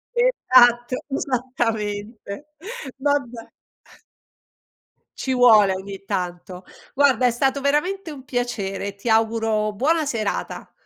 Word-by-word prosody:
Esatto, 255 - +4
esattamente. 230 -3 -3 0.5
Vabbè. 265 -5 -2 1.7
Ci 265 - -3
vuole 220 -6 +6
ogni 195 +1 -8
tanto. 180 0 -4 0.3
Guarda, 265 -3 +3
è 245 - +4
stato 270 +3 0
veramente 320 +6 0
un 270 -3 -10
piacere. 200 -6 -3
Ti 210 +4 -5
auguro 220 -1 +1
buona 310 +8 +1
serata. 220 -7 -3
240 Hz, 95 wpm, -22 LUFS, 210-270 Hz, 1.7 s, vuole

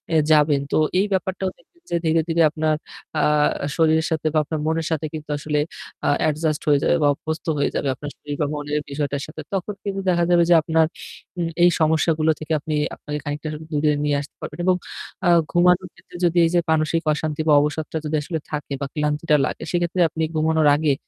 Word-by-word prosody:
এ - - +6
যাবেন। 150 -2 +4
তো - - +2 0.2
এই 200 - +3
ব্যাপারটাও 190 0 -1
দেখবেন - - -27 0.2
যে - - +1
ধীরে, 160 0 +3
ধীরে 165 0 +2
আপনার 155 0 0 0.4
আ - - +2 0.5
শরীরের 160 0 +3
সাথে 160 -1 0
বা 155 - +2
আপনার 155 +1 -4
মনের 160 0 0
সাথে 155 0 -1
কিন্তু 155 -1 -7
আসলে 150 0 -1 0.5
আ - - +4
অ্যাডজাস্ট 155 0 0
হয়ে 145 -1 +5
যাবে - - +3
বা - - +5
অভ্যস্ত 160 +2 -5
হয়ে 140 - +1
যাবে 140 - -1
আপনার 145 +3 -7
শরীর 145 -1 -6
বা 150 - +3
মনের 150 0 -2
বিষয়টার 140 0 -2
সাথে। 155 +1 -9
তখন 195 +2 -2
কিন্তু 195 -1 -3
দেখা 175 -1 +2
যাবে 175 -1 +5
যে 175 - +7
আপনার 160 +1 +2 0.5
উ - - 0 0.2
এই 175 - +8
সমস্যাগুলো 160 0 +2
থেকে 155 +1 -7
আপনি 155 +1 -3 0.2
আপনি 150 0 -5
খানিকটা 150 +1 -4 0.2
দূরে 150 0 +2
নিয়ে 145 -1 +1
আসতে 145 - -12
পারবেন। - - -7
এবং 185 - +4 0.5
আ - - +5 0.2
ঘুমানোর 180 +1 +3
ক্ষেত্রে - - -18
যদি 175 0 +1
এইযে 175 +1 +2
মানসিক 160 +1 +1
অশান্তি 150 0 -3
বা 150 - +5
অবসরটা 150 +2 -2
যদি 155 +1 -1
আসলে 160 +2 -3
থাকে 145 -1 -4
বা - - 0
ক্লান্তিটা 150 +1 +1
লাগে - - -5
সেক্ষেত্রে 175 +1 0
আপনি 160 +1 -3
ঘুমানোর 160 0 +2
আগে 150 -1 +2
155 Hz, 200 wpm, -22 LUFS, 150-165 Hz, 0.5 s, এই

